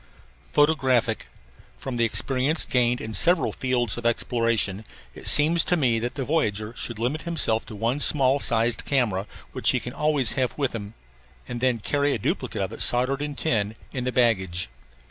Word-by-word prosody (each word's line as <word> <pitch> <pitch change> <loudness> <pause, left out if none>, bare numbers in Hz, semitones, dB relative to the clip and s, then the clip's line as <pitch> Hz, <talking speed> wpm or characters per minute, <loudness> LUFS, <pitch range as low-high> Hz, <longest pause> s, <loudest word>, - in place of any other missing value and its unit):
PHOTOGRAPHIC 130 -7 +1 0.5
From 130 -2 -6
the 115 - +2
experience 135 +7 +1
gained 125 -1 +1
in 110 - -6
several 175 - +3
fields 120 -3 +1
of 120 - -11
exploration 115 -4 0 0.3
it - - -7
seems 160 +3 +5
to 180 - +1
me 120 -7 +2
that 120 +2 -4
the 140 - -3
voyager 110 -8 -1
should 120 -2 -5
limit 125 +8 -2
himself 150 -10 -1
to 110 - -9
one 115 +6 -1
small 140 -2 +4
sized 115 -2 +1
camera, 110 -8 0 0.2
which - - 0
he - - +2
can - - -8
always 150 -6 +1
have 130 -2 -2
with 140 -3 -1
him, 105 -1 -7 0.5
and 120 -1 -6
then 130 -2 +2
carry 145 +5 0
a - - -1
duplicate 100 - -3
of - - -5
it, - - -5
soldered 130 +3 +2
in 145 -1 -4
tin, 110 -8 -1 0.2
in 130 -3 -3
the 125 - -2
baggage. 95 - +1
125 Hz, 180 wpm, -24 LUFS, 115-140 Hz, 0.5 s, seems